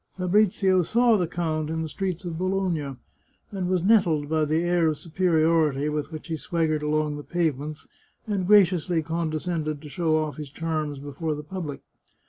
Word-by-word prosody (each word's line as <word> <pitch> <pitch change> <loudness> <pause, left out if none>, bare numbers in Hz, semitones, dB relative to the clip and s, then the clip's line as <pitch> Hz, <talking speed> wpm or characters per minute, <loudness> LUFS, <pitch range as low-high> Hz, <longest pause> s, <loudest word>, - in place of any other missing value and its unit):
Fabrizio 190 0 +3
saw 235 +6 +3
the 180 -5 +1
count 155 -2 -2
in 160 0 -2
the - - -3
streets 185 +1 -4
of 170 -2 -4
Bologna, 180 -7 -1 0.6
and 190 -3 -3
was 185 -2 +1
nettled 175 -9 +3
by 155 -1 +2
the 155 +3 +1
air 175 -1 +2
of 155 -1 0
superiority 160 -4 +2
with 150 0 -3
which 155 -1 -7
he 165 -1 -2
swaggered 155 -1 -1
along 150 0 0
the 145 - -7
pavements, 155 -3 -2 0.4
and 200 -4 -1
graciously 180 -5 +4
condescended 160 -1 -2
to 150 0 -11
show 160 0 0
off 155 -1 -2
his 150 -2 -6
charms 155 -1 -3
before 145 +3 -4
the 150 - -7
public. 155 -3 -6
160 Hz, 170 wpm, -25 LUFS, 150-180 Hz, 0.6 s, graciously